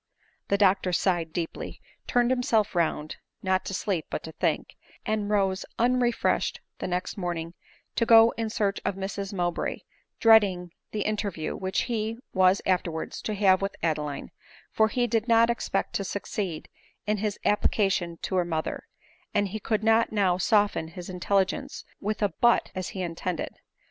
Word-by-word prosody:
The 200 - +2
doctor 190 -2 +3
sighed 175 -2 +1
deeply; 165 0 -5 0.3
turned 245 0 +2
himself 230 -4 +2
round, 160 -3 -1 0.3
not 185 -1 +1
to - - -4
sleep 185 -5 -1
but - - -4
to 160 - -7
think, - - -1 0.3
and 215 -1 -1
rose 195 -2 +1
unrefreshed 240 0 +1 0.2
the - - -3
next 180 +2 -3
morning 170 -2 -3 0.4
to 230 - +2
go 225 0 +8
in 225 -1 -2
search 205 -2 -1
of - - -1
Mrs 195 0 -4
Mowbray, 175 -3 -2 0.4
dreading 200 -6 +5 0.2
the 210 - -3
inter 215 -1 0
iew 160 -4 -4
which 190 0 -1
he 225 -1 -2 0.2
was 185 0 +4
afterwards 175 -3 -1
to 215 - -3
have 195 -2 +4
with 195 0 -2
Adeline; 150 -3 -2 0.4
for 220 - +3
he 245 +3 0
did 225 0 0
not 230 0 +5
expect 195 -4 -2
to 195 - -3
succeed 195 -4 -4 0.4
in 210 +1 +1
his 205 0 -2
application 195 -4 +1
to, 190 - -1
her 180 - +3
mother, 160 -2 -3 0.5
and 205 -1 +2
he 215 +3 -4
could 215 +1 -1
not 225 +1 +4
now 195 -4 +2
soften 205 -2 +2
his 175 +2 -8
intelligence 195 +9 -1
with 210 +1 -2
a 205 - +3
" - - -30
but," 235 0 +4
as 185 -1 -4
he 185 - -1
intended. 170 0 -4
195 Hz, 165 wpm, -27 LUFS, 180-215 Hz, 0.5 s, go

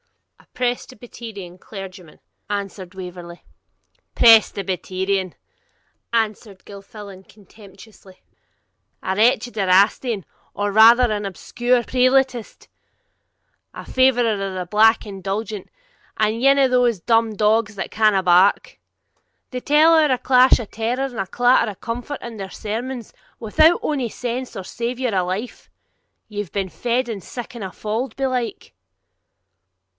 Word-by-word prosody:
'A - - -23
Presbyterian 235 -6 -5
clergyman,' 190 -5 -11 0.3
answered 195 -2 -5
Waverley. 175 -2 -9 0.7
'Presbyterian!' 190 -4 +2 0.8
answered 215 -3 -2
Gilfillan 200 -1 -11
contemptuously; 200 -1 -17 0.8
'a 190 - -2
wretched 240 +2 +2
Erastian, 200 +2 +2 0.3
or 205 0 -1
rather 230 +4 +6
an 205 -1 -2
obscure 240 +5 -1
Prelatist, 255 -1 0 1.1
a - - -9
favourer 245 -3 +2
of 205 - -4 0.2
the 180 -1 -4
black 220 +3 +4
indulgence, 200 +1 -5 0.5
ane 230 +6 +3
of 265 -2 +3
thae 250 -1 +3
dumb 225 -2 +2
dogs 215 +1 +1
that 190 - -5
canna 210 -3 +2
bark; 180 +2 +3 0.7
they 250 - -4
tell 300 +5 +4
ower 310 -3 +4
a 255 - +2
clash 255 +1 +4
o' 235 - -5
terror 230 +5 -3
and 250 -4 -7
a 195 - -2
clatter 245 0 +2
o' - - -12
comfort 245 +7 -6
in 235 -2 -8
their 195 -2 -6
sermons, 235 +2 -5 0.3
without 310 +10 +3
ony 270 -6 -1
sense, 245 +3 -5
or 195 - -5
savour, 240 +3 -3
or 185 - +2
life. 190 +7 -5 0.6
Ye've 205 -3 -6
been 195 -2 -3
fed 245 +5 -1
in 215 -4 -5
siccan 240 +4 -8
a 190 - -4
fauld, 220 +5 -4
belike?' 255 -5 -3
220 Hz, 120 wpm, -21 LUFS, 195-245 Hz, 1.1 s, rather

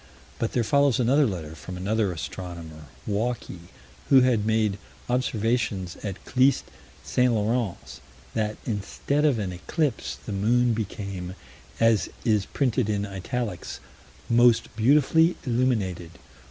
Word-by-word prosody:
But 115 - -1
there 120 - +2
follows 140 +3 +3
another 135 +4 +4
letter, 80 -6 -5
from 90 +3 -8
another 100 +2 0
astronomer, 85 -2 -7 0.2
Walkey, 105 -5 -3 0.4
who 135 -2 +7
had 120 -4 +2
made 110 -3 +1 0.3
observations 115 -6 0
at 100 -2 -6
Clyst 130 +1 +3 0.4
St. 125 0 +2
Lawrence: 110 -2 -2 0.3
that, 105 -1 -1
instead 125 +7 -1
of 140 -6 +3
an 100 -4 -2
eclipse, 140 - -2
the - - -5
moon 120 +4 +2
became 100 -4 -5 0.4
as 115 -2 +3 0.2
is 105 -4 +2
printed 125 -4 0
in 105 -1 0
italics 100 - -4 0.5
"most 120 -1 +4
beautifully 150 +8 +4
illuminated" 115 -9 0
110 Hz, 120 wpm, -26 LUFS, 95-125 Hz, 0.5 s, who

